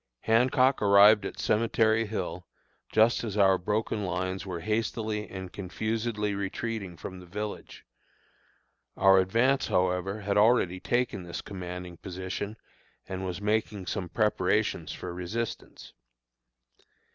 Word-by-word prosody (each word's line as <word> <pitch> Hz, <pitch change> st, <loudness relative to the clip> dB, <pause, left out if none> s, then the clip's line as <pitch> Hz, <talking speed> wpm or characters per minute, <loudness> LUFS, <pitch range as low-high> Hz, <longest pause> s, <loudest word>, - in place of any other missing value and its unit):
Hancock 125 Hz, +3 st, +3 dB
arrived 100 Hz, +1 st, +6 dB
at -, -, -9 dB
Cemetery 110 Hz, 0 st, +2 dB
Hill 90 Hz, -4 st, -4 dB, 0.4 s
just 110 Hz, +2 st, +4 dB
as 105 Hz, -3 st, -4 dB
our 95 Hz, -2 st, +5 dB
broken 105 Hz, +2 st, -1 dB
lines 95 Hz, 0 st, -3 dB
were 85 Hz, -3 st, -4 dB
hastily 110 Hz, 0 st, -2 dB
and 95 Hz, -2 st, -7 dB
confusedly 105 Hz, +2 st, -2 dB
retreating 100 Hz, -1 st, -4 dB
from 95 Hz, +2 st, -8 dB
the 90 Hz, -, -13 dB
village; 105 Hz, +3 st, -6 dB, 1.1 s
our 95 Hz, 0 st, +6 dB
advance, 115 Hz, +9 st, +2 dB
however, 90 Hz, +3 st, 0 dB
had 100 Hz, 0 st, 0 dB
already 105 Hz, -5 st, +3 dB
taken 120 Hz, -2 st, -1 dB
this 85 Hz, -1 st, -6 dB
commanding 90 Hz, -2 st, -7 dB
position 95 Hz, +4 st, -5 dB, 0.5 s
and 95 Hz, 0 st, -5 dB
was 90 Hz, +1 st, -5 dB
making 105 Hz, -2 st, -1 dB
some 90 Hz, -1 st, -3 dB
preparation 105 Hz, -4 st, +1 dB
for 90 Hz, -, -6 dB
resistance. 100 Hz, +7 st, -5 dB
100 Hz, 120 wpm, -28 LUFS, 95-110 Hz, 1.1 s, arrived